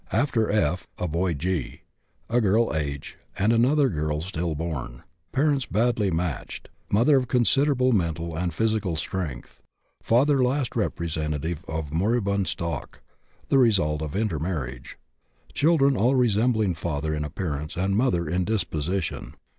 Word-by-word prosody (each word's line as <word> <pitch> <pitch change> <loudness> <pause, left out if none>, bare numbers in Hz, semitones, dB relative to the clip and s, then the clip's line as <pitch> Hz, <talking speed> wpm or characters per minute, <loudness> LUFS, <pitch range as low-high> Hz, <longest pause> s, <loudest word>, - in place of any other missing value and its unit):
After 115 -1 +1
F. 90 -4 0
a 90 - -2
boy 85 +2 0
G., 85 -1 -3 0.5
a 120 +2 +2
girl 110 -1 +2
H., 70 -2 -4 0.2
and 100 +4 +3
another 135 +5 +4
girl 75 -5 -1
stillborn. 80 -7 -4 0.3
Parents 140 -2 +1
badly 110 -1 +1
matched; 85 -2 -3 0.2
mother 120 +8 +4
of 130 -2 0
considerable 130 +2 +3
mental 85 -5 -1
and 85 +1 -1
physical 110 -2 0
strength; 80 -5 -5 0.4
father 135 +3 +3
last 130 +1 0
representative 80 -5 -2
of 80 -2 -4
moribund 100 +1 +1
stock, 85 0 -4 0.5
the 135 - +4
result 90 - +3
of 75 -2 -4
intermarriage. 80 - -3 0.6
Children 140 -3 +3
all 125 +4 +3
resembling 110 -4 +2
father 80 -2 -3
in 75 -1 -2
appearance 75 0 -4
and 95 +2 +1
mother 90 -8 +1
in 90 +3 0
disposition. 90 -3 -2
95 Hz, 130 wpm, -25 LUFS, 80-115 Hz, 0.6 s, another